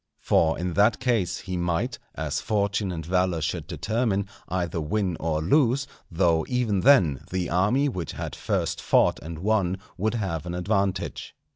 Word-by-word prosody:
For 80 0 +2
in 90 0 -2
that 105 +4 +3
case 100 -10 0
he 95 -1 -5
might, 85 -1 -1 0.2
as 75 -2 -2
fortune 100 -2 0
and 80 -3 -5
valour 90 -1 +1
should 75 - -3
determine, 110 -3 -1 0.2
either 85 -2 -1
win 90 +3 -1
or 80 -1 -1
lose; 135 - +3 0.2
though, 85 -2 +2
even 120 -6 +1
then, 90 - +4
the 90 -1 -2
army 105 +11 +2
which 90 - -4
had - - -5
first - - -1
fought - - +3
and 80 +1 -7
won 95 0 +1 0.2
would 110 +4 0
have 90 -7 -3
an 85 - -3
advantage. 95 0 -1
95 Hz, 160 wpm, -25 LUFS, 85-110 Hz, 0.2 s, then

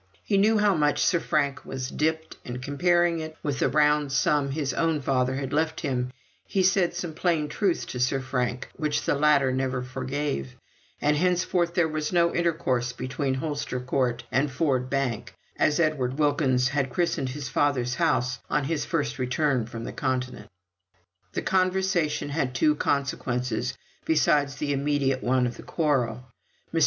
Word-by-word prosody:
He 200 -2 +2
knew 215 +2 +4
how 205 -1 +4
much 150 -3 +2
Sir 170 - +3
Frank 145 -3 0
was 130 -1 -5
dipped, 160 +1 -1
and 125 0 -6
comparing 175 +5 +2
it 155 0 -7
with 145 -3 -2
the - - +2
round 150 0 +3
sum 140 +1 +2
his 140 -2 -2
own 165 -2 +1
father 130 -1 0
had 135 -1 -4
left 160 +1 0
him, 125 -4 -1 0.4
he 190 - +1
said 185 -2 +2
some 175 -2 -4
plain 160 -2 0
truths 190 +1 0
to 125 - -6
Sir 130 +2 +1
Frank 125 -1 -2
which 150 -3 -1
the - - +2
latter 145 -2 +3
never 130 -1 -1
forgave, 130 - -3 0.4
and 150 +1 +2
henceforth 175 0 +1
there 170 -2 +3
was 155 -1 -3
no 170 -1 +3
intercourse 130 -8 0
between 130 +2 -2
Holster 145 -2 -3
Court 125 -1 -1
and 140 +3 +2
Ford 130 -2 0
Bank, 135 -5 -2 0.2
as 150 - +3
Mr. 155 -2 +3
Edward 130 -3 -3
Wilkins 135 -4 +2
had 140 -1 0
christened 165 -2 0
his 140 0 -5
father's 130 -2 +1
house 125 0 +1
on 150 - +1
his 155 +2 -1
first 145 -5 -2
return 130 -1 0
from 115 0 -7
the - - -6
Continent. 130 -2 -3 0.8
The - - -2
conversation 185 -5 +1
had 140 -4 -1
two 150 +6 +4
consequences 125 -4 -1 0.3
besides 145 -3 +2
the 145 0 -1
immediate 140 -1 0
one 125 0 +2
of 120 -1 -3
the - - -9
quarrel. 130 -7 0 0.5
Mr. - - +2
145 Hz, 170 wpm, -26 LUFS, 130-160 Hz, 0.8 s, knew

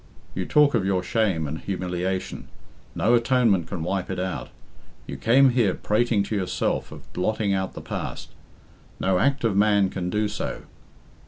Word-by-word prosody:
"You 90 -1 -3
talk 150 -1 +4
of 115 -5 +2
your 95 -1 0
shame 95 -7 0
and 75 +2 -4
humiliation 90 0 -3 0.5
no 115 - +2
atonement 115 -7 +3
can 85 -1 -4
wipe 95 +2 -2
it 95 - -3
out. 95 0 -3 0.6
You - - -6
came 130 +3 +4
here 115 -6 +2
prating 110 -1 +1
to 105 - -3
yourself 95 -3 -1
of - - -13
blotting 105 +2 0
out 95 -1 -2
the - - -6
past - - -5 0.7
no 95 -1 +2
act 140 +4 +1
of 110 -4 +1
man 100 -1 +3
can 90 -2 -3
do 105 +3 0
so. 105 +1 -4
100 Hz, 165 wpm, -24 LUFS, 90-115 Hz, 0.7 s, talk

